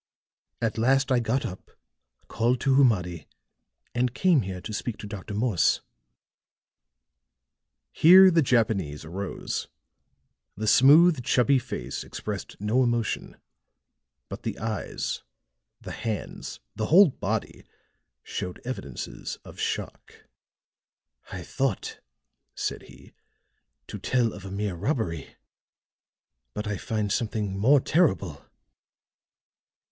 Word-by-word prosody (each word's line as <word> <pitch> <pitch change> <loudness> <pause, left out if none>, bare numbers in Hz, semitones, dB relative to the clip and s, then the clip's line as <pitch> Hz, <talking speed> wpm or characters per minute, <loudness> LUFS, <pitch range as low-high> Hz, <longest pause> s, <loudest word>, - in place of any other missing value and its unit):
At 115 -1 -1
last 135 +4 +3
I 125 - +4
got 120 +3 0
up, 95 - -8 0.6
called 120 +2 +1
to 135 - +2
Humadi 90 - +2 0.7
and 125 0 0
came 175 -5 +4
here 95 -2 -5
to 105 - -7
speak 110 +1 -3
to - - -8
Dr. 100 0 -7
Morse." 105 -4 +2 2.1
Here 185 +3 +8
the 165 -1 +4
Japanese 105 - 0
arose; 95 +5 -4 0.9
the 110 - -3
smooth 145 +5 +6
chubby 130 +2 +3
face 125 - -5
expressed - - -6
no 105 +5 +1
emotion, 120 -3 -1 0.9
but - - -7
the - - -4
eyes, 110 -1 -3 0.6
the - - -8
hands, 110 -3 -5 0.2
the 110 - -2
whole 185 +2 +7
body 110 -3 -4 0.6
showed 90 -1 -5
evidences 95 - -6
of - - -12
shock. - - -5 1.1
"I - - -6
thought," - - -2 0.6
said - - -3
he, - - -16 0.7
"to - - -8
tell 120 -4 +1
of 100 -1 -10
a 95 - -7
mere 100 0 -2
robbery; 85 - -3 1.2
but 105 - -3
I 105 -1 -2
find 105 -1 -2
something 105 -3 -1
more 130 +9 +5
terrible!" 125 - +1
115 Hz, 110 wpm, -26 LUFS, 100-130 Hz, 2.1 s, Here